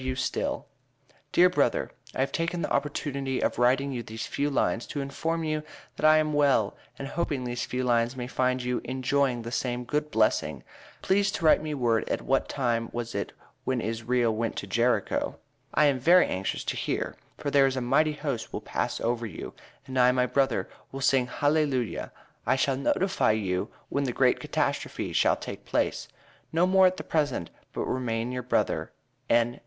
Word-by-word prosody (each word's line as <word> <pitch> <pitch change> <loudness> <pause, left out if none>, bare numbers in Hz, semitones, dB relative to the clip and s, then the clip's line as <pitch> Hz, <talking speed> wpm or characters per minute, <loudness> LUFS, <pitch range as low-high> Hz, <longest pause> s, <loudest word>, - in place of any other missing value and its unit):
W. 130 0 -2
STILL: 130 - -2 0.7
Dear 180 - +6
brother 180 - +1 0.2
i - - 0
have 135 - 0
taken 170 0 -1
the - - -3
opportunity 140 -2 -1
of - - 0
writing 130 +3 +3
you 125 -2 -3
these 110 -1 -6
few 145 +1 -1
lines 115 -5 0
to 145 - -4
inform 160 +4 -2
you 155 -1 -1 0.3
that 155 - +3
i 155 0 +7
am 155 -1 +1
well 140 -8 +3 0.2
an 140 - -5
hoping 145 -2 -2
these 120 0 -3
few 130 +1 -2
lines 120 0 +2
may 125 -1 -4
find 130 0 0
you 125 0 -1
enjoying 130 -1 0
the 115 - -6
same 125 0 -1
good 150 +4 -1
blessing 110 -5 +1 0.4
please 195 +1 +2
to 165 - -2
write 155 - +6
me 155 -1 -3
word 120 -4 +1
at - - -1
what 135 0 +1
time 120 -4 0
was 120 0 -4
it 100 - -3 0.3
when 130 -1 0
isreal 115 +1 0
went 115 +1 -2
to - - -4
Jerico 115 +5 +1 0.4
i 150 - +5
am 140 -3 +3
very 175 +7 +6
anxious 95 +1 -2
to - - -2
hear - - -2 0.2
for 145 - -3
thare 140 -1 +5
is 135 0 -2
a - - +2
mighty 155 +5 +2
host 145 -6 -4
will - - -4
pass - - -2
over 120 0 -1
and - - -11
you - - -7 0.3
and 130 -1 -2
i 125 0 +6
my 125 0 +2
brother 135 +1 +1 0.2
will 135 - -6
sing 135 -2 +3
hally 150 +4 +2
luja 125 -5 -2 0.4
i 130 - +4
shall 135 0 +1
notify 180 - +2
you 95 -4 -1 0.2
when 140 0 0
the 125 - -1
great 125 0 +3
catastrophe - - -2
shal - - +4
take - - -8
place - - -1 0.4
No 165 +3 +3
more 190 0 +6
at 185 0 -1
the - - -5
present 145 - -1 0.2
but - - -4
remain 120 -2 -1
your 125 0 -3
brother 125 - 0 0.4
N. 120 +1 +2
130 Hz, 195 wpm, -27 LUFS, 120-145 Hz, 0.7 s, i